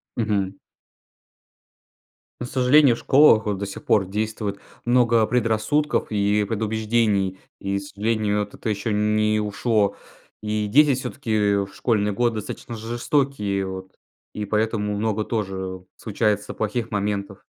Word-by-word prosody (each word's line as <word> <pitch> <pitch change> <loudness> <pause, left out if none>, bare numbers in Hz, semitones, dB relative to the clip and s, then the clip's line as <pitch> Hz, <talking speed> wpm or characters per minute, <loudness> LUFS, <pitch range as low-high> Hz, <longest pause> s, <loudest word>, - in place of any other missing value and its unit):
Мгм. 100 -4 -1 1.8
Ну, 120 - -4
к - - -8
сожалению, 130 0 +5
в - - -10
школах 130 -5 +5
вот 100 - 0
до 100 - -3
сих 100 - -8
пор 100 -3 +3
действует 105 0 -3 0.3
много 120 -2 +4
предрассудков, 120 +6 0
и 105 0 +2
предубеждений, 110 -3 0 0.2
и, 100 0 -2
к - - -9
сожалению, 105 +1 -1
вот 105 - -6
это - - -5
еще 105 +1 -1
не 105 +1 +2
ушло. 105 0 0 0.5
И 105 0 -1
дети 145 +5 +5
всё-таки 110 -6 0
в - - -14
школьные 105 -1 0
годы 120 +1 +1
достаточно 110 +2 -6
жестокие 115 -3 -1
вот 95 0 -7 0.4
и 105 - -4
поэтому 105 0 0
много 110 0 -1
тоже 95 -4 -4
случается 105 -1 -1
плохих 110 +2 -3
моментов. 100 -1 -3
105 Hz, 135 wpm, -23 LUFS, 100-115 Hz, 1.8 s, сожалению